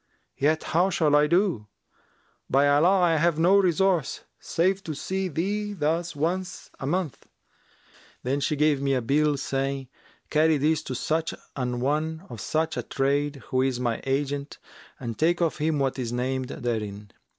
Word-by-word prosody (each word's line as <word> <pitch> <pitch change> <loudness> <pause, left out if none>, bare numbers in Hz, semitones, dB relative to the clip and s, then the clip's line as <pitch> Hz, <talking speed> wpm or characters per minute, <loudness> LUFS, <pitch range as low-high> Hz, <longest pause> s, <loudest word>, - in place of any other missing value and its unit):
Yet 155 +3 +2
how 180 +4 +2
shall 155 -5 +2
I 150 0 +5
do? 170 - +1 0.8
By 140 +1 +4
Allah, 170 +7 +4
I 165 -2 +3
have 165 0 +2
no 175 +4 +5
resource 185 -4 +2 0.2
save 190 +3 0
to 155 - -4
see 190 +5 -2
thee 205 +6 -2
thus 165 0 -1
once 175 +5 -3
a 135 - -4
month.' 175 -2 -2 1.0
Then 135 +3 0
she 145 +2 0
gave 150 -1 +2
me 135 -1 +1
a 130 - 0
bill 145 +3 +2
saying, 135 -1 -2 0.4
'Carry 155 0 +4
this 150 +2 +1
to 130 - -4
such 160 +5 -1 0.2
an 125 -2 -2
one 155 +5 -1
of 115 -5 -7
such 160 - -1
a - - 0
trade 140 0 -1
who 130 - +2
is 130 -2 0
my 120 -2 -1
agent 140 +1 -2 0.4
and 115 -3 -5
take 170 +2 +2
of 170 -2 0
him 155 0 0
what 135 -1 0
is 120 -2 -3
named 130 +1 -1
therein.' 105 -5 -4
150 Hz, 165 wpm, -26 LUFS, 135-165 Hz, 1.0 s, I